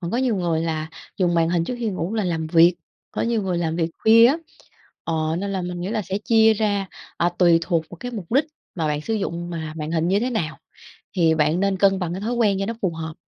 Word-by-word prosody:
Còn 170 Hz, -2 st, -4 dB
có 235 Hz, -, -1 dB
nhiều 250 Hz, -4 st, +1 dB
người 170 Hz, -3 st, 0 dB
là 160 Hz, -1 st, -2 dB, 0.3 s
dùng 175 Hz, -3 st, +1 dB
màn 165 Hz, -1 st, +3 dB
hình 170 Hz, -1 st, +1 dB
trước 250 Hz, -, -3 dB
khi 235 Hz, -2 st, -1 dB
ngủ 185 Hz, 0 st, -3 dB
là 215 Hz, -2 st, 0 dB
làm 165 Hz, -3 st, -1 dB
việc, 170 Hz, +2 st, +5 dB, 0.4 s
có -, -, -3 dB
nhiều 230 Hz, -2 st, 0 dB
người 180 Hz, -3 st, -1 dB
làm 165 Hz, -1 st, -1 dB
việc 165 Hz, -1 st, 0 dB
khuya 230 Hz, +1 st, +7 dB
á. 275 Hz, -, +3 dB, 0.7 s
Ờ, 160 Hz, -1 st, -1 dB
nên 200 Hz, +1 st, -3 dB
là 190 Hz, -, -2 dB
mình 175 Hz, 0 st, -5 dB
nghĩ 180 Hz, -, -3 dB
là 215 Hz, -1 st, -1 dB
sẽ 190 Hz, +1 st, -3 dB
chia 220 Hz, +1 st, +4 dB
ra, 205 Hz, -2 st, 0 dB, 0.3 s
à, 175 Hz, -, +2 dB
tùy 170 Hz, -2 st, +5 dB
thuộc 165 Hz, -2 st, 0 dB
vào -, -, -9 dB
cái 245 Hz, -, -5 dB
mục 205 Hz, -7 st, -7 dB
đích 285 Hz, +3 st, +4 dB, 0.3 s
mà 165 Hz, -3 st, -1 dB
bạn 150 Hz, 0 st, -1 dB
sử 225 Hz, -, -3 dB
dụng 175 Hz, -5 st, -3 dB
mà 160 Hz, -2 st, -5 dB
màn 155 Hz, 0 st, -4 dB
hình 165 Hz, 0 st, 0 dB
như 195 Hz, +3 st, +2 dB
thế 245 Hz, -, -1 dB
nào 160 Hz, -, -2 dB, 0.6 s
thì 165 Hz, -3 st, +3 dB
bạn 155 Hz, +2 st, +2 dB
nên 195 Hz, 0 st, +1 dB
cân 195 Hz, 0 st, +3 dB
bằng 175 Hz, -3 st, -2 dB
cái 185 Hz, -, -5 dB
thói 230 Hz, +4 st, -2 dB
quen 210 Hz, -5 st, +2 dB
cho 195 Hz, -, -1 dB
nó 230 Hz, -, -3 dB
phù 190 Hz, -, +1 dB
hợp. 160 Hz, -1 st, -6 dB
180 Hz, 265 wpm, -22 LUFS, 165-210 Hz, 0.7 s, khuya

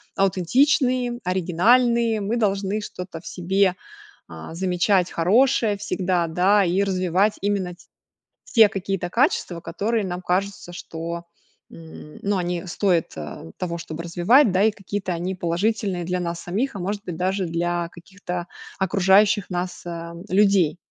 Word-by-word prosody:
аутентичные, 245 Hz, -, +2 dB
оригинальные. 220 Hz, +6 st, +2 dB
Мы 215 Hz, +4 st, -1 dB
должны 200 Hz, -1 st, 0 dB
что-то 180 Hz, -5 st, -7 dB
в -, -, -12 dB
себе, 185 Hz, +1 st, +1 dB, 0.5 s
а, 80 Hz, -, -9 dB
замечать 180 Hz, +1 st, +1 dB
хорошее 215 Hz, +4 st, +3 dB
всегда, 185 Hz, -3 st, -1 dB
да, 190 Hz, +5 st, +3 dB
и 180 Hz, +2 st, +1 dB
развивать 190 Hz, +1 st, +1 dB
именно 195 Hz, -3 st, -1 dB
ть 175 Hz, -, -21 dB, 0.6 s
те 225 Hz, -4 st, +6 dB
какие-то 195 Hz, -2 st, -3 dB
качества, 230 Hz, -, +1 dB
которые 205 Hz, +7 st, -1 dB
нам 180 Hz, 0 st, -5 dB
кажутся, 185 Hz, 0 st, -2 dB
что, 170 Hz, 0 st, -6 dB, 0.5 s
м, 160 Hz, -2 st, -12 dB
ну, 200 Hz, -1 st, 0 dB
они 175 Hz, -1 st, -2 dB
стоят, 175 Hz, -2 st, 0 dB
а, 75 Hz, +1 st, -8 dB
того, 170 Hz, -2 st, -3 dB
чтобы 160 Hz, 0 st, -6 dB
развивать, 195 Hz, -, +4 dB
да. 190 Hz, +1 st, +2 dB
И 220 Hz, -, +5 dB
какие-то 200 Hz, -2 st, -4 dB
они 175 Hz, +2 st, -3 dB
положительные 185 Hz, +1 st, -1 dB
для 180 Hz, +1 st, -1 dB
нас 170 Hz, -1 st, -3 dB
самих, 215 Hz, +10 st, -2 dB
а, -, -, -5 dB
может 200 Hz, +3 st, -3 dB
быть, 175 Hz, -5 st, -5 dB
даже 190 Hz, +2 st, 0 dB
для 170 Hz, +1 st, -1 dB
каких-то 180 Hz, 0 st, -7 dB, 0.3 s
окружающих 195 Hz, +1 st, +3 dB
нас, 180 Hz, 0 st, -4 dB
а, 170 Hz, -1 st, -6 dB, 0.2 s
людей. 195 Hz, -4 st, +3 dB
185 Hz, 140 wpm, -23 LUFS, 175-205 Hz, 0.6 s, те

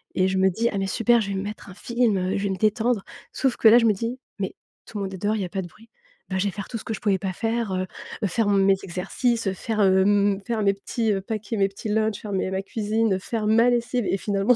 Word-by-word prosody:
et 185 Hz, -, +3 dB
je 190 Hz, 0 st, 0 dB
me 190 Hz, 0 st, +5 dB
dis: 225 Hz, +6 st, 0 dB
«Ah 200 Hz, -, -1 dB
mais 195 Hz, -, -1 dB
super, 235 Hz, +3 st, +3 dB
je 200 Hz, -, -3 dB
vais 195 Hz, -, -2 dB
me 190 Hz, -, -2 dB
mettre 205 Hz, 0 st, -7 dB
un 185 Hz, -, -9 dB
film, 235 Hz, -1 st, +1 dB
heu, 185 Hz, +1 st, -1 dB
je -, -, -3 dB
vais 200 Hz, -, 0 dB
me 190 Hz, -, -2 dB
détendre». 220 Hz, +1 st, +1 dB, 0.3 s
Sauf 265 Hz, -3 st, 0 dB
que -, -, +4 dB
là, 225 Hz, +2 st, +9 dB
je 230 Hz, -, +4 dB
me 215 Hz, -, +5 dB
dis: 230 Hz, +5 st, -4 dB, 0.2 s
«Mais 190 Hz, -, -3 dB, 0.3 s
tout 215 Hz, -, -7 dB
le 200 Hz, -, -2 dB
monde 195 Hz, 0 st, -4 dB
est -, -, -5 dB
dehors, 210 Hz, +3 st, 0 dB
il 210 Hz, -, -2 dB
y -, -, -1 dB
a 180 Hz, -, -7 dB
pas 195 Hz, 0 st, -3 dB
de 175 Hz, -, -7 dB
bruit». 225 Hz, +7 st, -20 dB, 0.4 s
Bah, 190 Hz, -, -1 dB
je 185 Hz, -, 0 dB
vais 200 Hz, -, 0 dB
faire 200 Hz, +1 st, -7 dB
tout 235 Hz, -, -3 dB
ce -, -, -10 dB
que 225 Hz, -, -3 dB
je 215 Hz, -, -6 dB
pouvais 200 Hz, -3 st, +2 dB
pas 190 Hz, 0 st, -3 dB
faire, 225 Hz, -1 st, -1 dB
heu 185 Hz, 0 st, -1 dB, 0.4 s
heu, -, -, +3 dB
faire 215 Hz, +3 st, 0 dB
mes 195 Hz, -1 st, +4 dB
exercices, 200 Hz, +5 st, -1 dB
heu, 190 Hz, -, +1 dB
faire, 215 Hz, +3 st, -2 dB
hem, 200 Hz, +1 st, +4 dB
faire 225 Hz, -3 st, 0 dB
mes 200 Hz, 0 st, +4 dB
petits 220 Hz, +2 st, -2 dB, 0.2 s
paquets, 220 Hz, 0 st, -3 dB
mes 195 Hz, -1 st, +3 dB
petits 195 Hz, +2 st, -7 dB
lunch, 215 Hz, 0 st, 0 dB
faire 210 Hz, -, -6 dB
mes 190 Hz, -1 st, -1 dB
ma 190 Hz, 0 st, -1 dB
cuisine, 215 Hz, -1 st, 0 dB
faire 215 Hz, +2 st, -3 dB
ma 230 Hz, +3 st, +5 dB
lessive 240 Hz, -1 st, 0 dB
et -, -, +1 dB
finalement 200 Hz, +4 st, +2 dB
205 Hz, 295 wpm, -24 LUFS, 195-225 Hz, 0.4 s, là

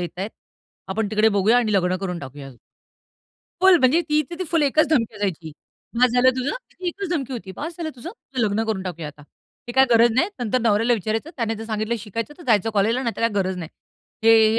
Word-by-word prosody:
येतायेत. 180 Hz, +4 st, -4 dB, 0.6 s
आपण 205 Hz, +2 st, -1 dB
तिकडे 215 Hz, +1 st, +4 dB
बघूया 205 Hz, +3 st, +3 dB
आणि 225 Hz, -3 st, 0 dB
लग्न 185 Hz, -2 st, +2 dB
करून 180 Hz, -2 st, -4 dB
टाकूया. 135 Hz, -1 st, -9 dB, 1.1 s
फुल 375 Hz, -1 st, +7 dB
म्हणजे 265 Hz, +6 st, +4 dB
ती 300 Hz, 0 st, +3 dB
तर 345 Hz, -, -4 dB
ती 370 Hz, -, -2 dB
फुल 330 Hz, -3 st, +2 dB
एकच 290 Hz, +2 st, +3 dB
धमकी 235 Hz, -10 st, 0 dB
द्यायची. 175 Hz, -6 st, -3 dB, 0.5 s
बास 250 Hz, -1 st, +5 dB
झालं 250 Hz, +1 st, +5 dB
तुझं. 255 Hz, -, -1 dB, 0.2 s
ती 365 Hz, -, -8 dB
एकच 395 Hz, +2 st, -4 dB
धमकी 275 Hz, -6 st, -2 dB
होती. 205 Hz, -6 st, -6 dB
बास 325 Hz, +3 st, -5 dB
झालं 325 Hz, -2 st, -4 dB
तुझं. 325 Hz, +9 st, -7 dB
तुझं 270 Hz, -, -7 dB
लग्न 210 Hz, +2 st, 0 dB
करून 205 Hz, -4 st, -1 dB
टाकूया 170 Hz, -4 st, -5 dB
आता. 150 Hz, 0 st, -14 dB, 0.4 s
ते 240 Hz, -, -5 dB
काय 265 Hz, +1 st, +6 dB
गरज 230 Hz, 0 st, +6 dB
नाही. 320 Hz, -, +3 dB
नंतर 245 Hz, +1 st, 0 dB
नवऱ्याला 225 Hz, +1 st, +2 dB
विचारायचं. 220 Hz, -, -3 dB
त्याने 225 Hz, -3 st, -1 dB
जर 220 Hz, -, -7 dB
सांगितलं 220 Hz, +1 st, -2 dB
शिकायचं, 230 Hz, +7 st, -5 dB
तर -, -, -11 dB
जायचं 225 Hz, -1 st, +3 dB
कॉलेजला 220 Hz, +5 st, +1 dB
नाही 235 Hz, -2 st, -2 dB
तर -, -, -6 dB
काही 230 Hz, -1 st, +2 dB
गरज 190 Hz, -2 st, 0 dB
नाही. 165 Hz, -3 st, -6 dB, 0.6 s
हे, 225 Hz, -, +7 dB, 0.2 s
हे -, -, +2 dB
225 Hz, 220 wpm, -22 LUFS, 200-260 Hz, 1.1 s, फुल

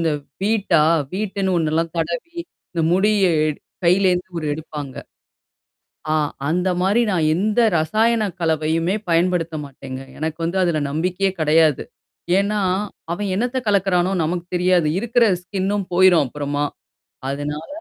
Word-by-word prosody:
இந்த 165 Hz, -2 st, +1 dB, 0.3 s
வீட்டா, 200 Hz, -7 st, +2 dB, 0.3 s
வீட்டுன்னு 195 Hz, -2 st, -1 dB
ஒண்ணெல்லாம் 160 Hz, +1 st, 0 dB
தடவி 170 Hz, -, -3 dB, 0.4 s
இந்த 170 Hz, -2 st, -1 dB
முடிய 205 Hz, +2 st, +3 dB, 0.2 s
எ -, -, +1 dB, 0.4 s
கையிலேந்து 180 Hz, 0 st, +3 dB
ஒரு 155 Hz, -, -4 dB
எடுப்பாங்க. 150 Hz, -3 st, -6 dB, 1.2 s
ஆ -, -, +2 dB, 0.4 s
அந்த 180 Hz, +4 st, +1 dB
மாரி 195 Hz, +5 st, +3 dB
நான் 170 Hz, -5 st, +1 dB
எந்த 210 Hz, +5 st, 0 dB, 0.2 s
ரசாயன 215 Hz, +5 st, +2 dB
கலவையுமே 160 Hz, +2 st, +1 dB
பயன்படுத்த 170 Hz, -1 st, +1 dB
மாட்டேங்க. 135 Hz, -1 st, -8 dB, 0.2 s
எனக்கு 160 Hz, +1 st, -3 dB
வந்து 170 Hz, +3 st, -1 dB
அதுல 170 Hz, -4 st, +1 dB
நம்பிக்கையே 180 Hz, +6 st, 0 dB
கெடையாது. 155 Hz, -1 st, +3 dB, 0.6 s
ஏன்னா, 205 Hz, +1 st, 0 dB, 0.5 s
அவன் 205 Hz, +3 st, -3 dB
என்னத்த 245 Hz, +6 st, -1 dB
கலக்குறானோ 190 Hz, -3 st, +2 dB
நமக்கு 170 Hz, +2 st, -2 dB
தெரியாது. 180 Hz, -3 st, +3 dB
இருக்கிற 235 Hz, +2 st, +2 dB, 0.2 s
ஸ்கின்னும் 195 Hz, +1 st, -2 dB
போயிரும் 180 Hz, -4 st, +5 dB
அப்புறமா. 145 Hz, +2 st, -2 dB, 0.7 s
அதனால, 145 Hz, +3 st, -4 dB
175 Hz, 120 wpm, -21 LUFS, 160-195 Hz, 1.2 s, போயிரும்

